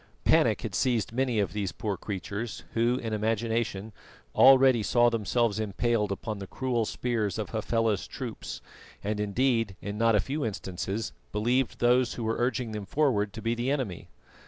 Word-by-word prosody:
Panic - - +3
had - - -4
seized 120 -6 +1
many 125 -2 0
of 100 -5 0
these 100 -3 -2
poor 105 -2 -3
creatures, 105 +3 -5
who, 120 +2 +2
in 115 -4 -4
imagination, 110 -1 -1 0.4
already 130 -2 +7
saw 120 +3 +3
themselves 115 0 +1
impaled 110 0 0
upon 105 +1 -4
the 95 - -7
cruel 125 -2 -1
spears 110 -5 -1
of 110 - -4
Hafela's 115 -1 0
troops, - - -6 0.4
and 105 +1 -2
indeed 115 0 +1
in 100 +1 -5
not 115 -1 +4
a - - +4
few 145 +6 -2
instances 95 - -3 0.2
believed 120 +4 +1
those 120 0 +3
who 120 - -4
were 110 +1 -1
urging 120 -1 0
them 105 -2 -5
forward 110 -6 +1
to 110 - -8
be 115 0 +1
the 120 +2 -1
enemy. 130 -11 -2
115 Hz, 165 wpm, -28 LUFS, 105-120 Hz, 0.4 s, already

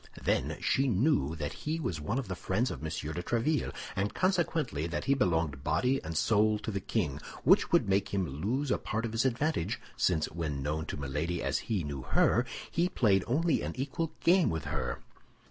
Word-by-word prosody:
Then - - 0
she 135 +1 +2
knew 100 - +2
that 75 -3 -4
he 155 +2 -3
was 90 - -3
one 105 - -1
of 135 - -2
the 95 - -3
friends 100 +7 0
of - - -5
M. 80 - -6
de 80 +2 -3
Tréville, 120 - 0 0.2
and 100 +2 -1
consequently, 165 - +1
that 85 - -3
he 140 - +3
belonged 80 - 0
body 100 - +1
and 80 0 -4
soul 110 +3 +3
to 110 - -4
the 100 - -2
king; 70 -5 -1 0.2
which - - +5
would - - +4
make 100 0 +2
him 95 -2 +1
lose 110 - -2
a - - +2
part 110 +2 -2
of 115 - -3
his 115 +3 +1
advantage, 130 - 0 0.2
since 80 -4 +2
when 75 -5 -3
known 75 +2 -2
to - - -4
Milady 75 +5 -2
as - - 0
he 105 -6 +1
knew 70 -2 -4
her, - - +2 0.2
he 175 +2 +1
played 100 - +3
only 160 +6 +2
an - - -3
equal 145 +5 -2
game 180 0 +5
with 80 -2 -3
her. - - -3
100 Hz, 200 wpm, -31 LUFS, -, 0.2 s, which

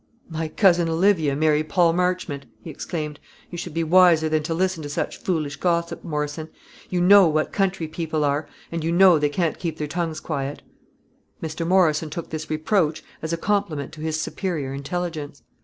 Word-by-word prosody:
"My 160 0 -2
cousin 175 -1 +3
Olivia 165 -4 +2
marry 155 0 +2
Paul 170 +1 +3
Marchmont!" 180 -5 -1 0.2
he 165 - -7
exclaimed. 150 -1 -5 0.3
"You 175 - -6
should 165 -2 -6
be 165 - +1
wiser 165 -1 +5
than 155 0 +1
to 155 +2 -3
listen 185 -1 0
to 145 - -6
such 155 +1 -3
foolish 155 -9 -2
gossip, 170 +1 -1
Morrison. 150 0 -3 0.4
You 180 -1 0
know 195 +1 +7
what 155 0 0
country 190 -4 0
people 160 -1 -2
are, 145 +1 0 0.2
and 165 -1 -3
you 165 - 0
know 180 -2 +6
they 145 0 +2
can't 165 +2 -1
keep 170 -3 -3
their 150 - -2
tongues 165 0 -3
quiet." 145 -2 -4 0.8
Mr. 160 +1 -4
Morrison 165 -4 +3
took 165 +2 -6
this 155 0 -5
reproach 155 0 0 0.2
as 160 - -3
a 170 - 0
compliment 170 -8 -1
to 155 - -11
his 160 0 -2
superior 155 -6 -3
intelligence. 145 -1 -4
160 Hz, 180 wpm, -23 LUFS, 150-175 Hz, 0.8 s, know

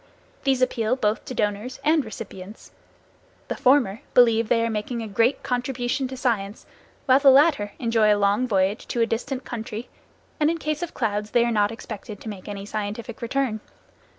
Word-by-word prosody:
These 265 -2 +3
appeal 240 -1 +1
both 215 -4 -1
to 255 - -6
donors 210 +4 -2
and 310 0 +3
recipients. 210 -2 -9 0.8
The - - -1
former 250 -6 +3
believe 230 -2 +5
that - - +4
they 230 0 +1
are - - -1
making 225 +2 -3
a - - -5
great 230 +6 +1
contribution 250 +1 -1
to 260 0 -7
science, 220 -6 -2 0.4
while 260 0 +5
the 280 -1 +6
latter 270 -7 +4
enjoy 225 -3 +3
a 205 - +4
long 205 +5 +2
voyage 195 0 0
to 240 - -1
a - - +5
distant 255 +4 -3
country, 225 0 -6 0.5
and 300 0 +3
in 335 - 0
case 305 0 -3
of 345 - -5
clouds 210 -3 -1
they 235 +2 +3
are 240 - 0
not 210 -1 +2
expected 215 -2 -8
to 225 - -6
make 195 -3 -9
any 200 -1 -6
scientific 215 +2 -5
return. 240 -2 -1
230 Hz, 185 wpm, -24 LUFS, 210-255 Hz, 0.8 s, the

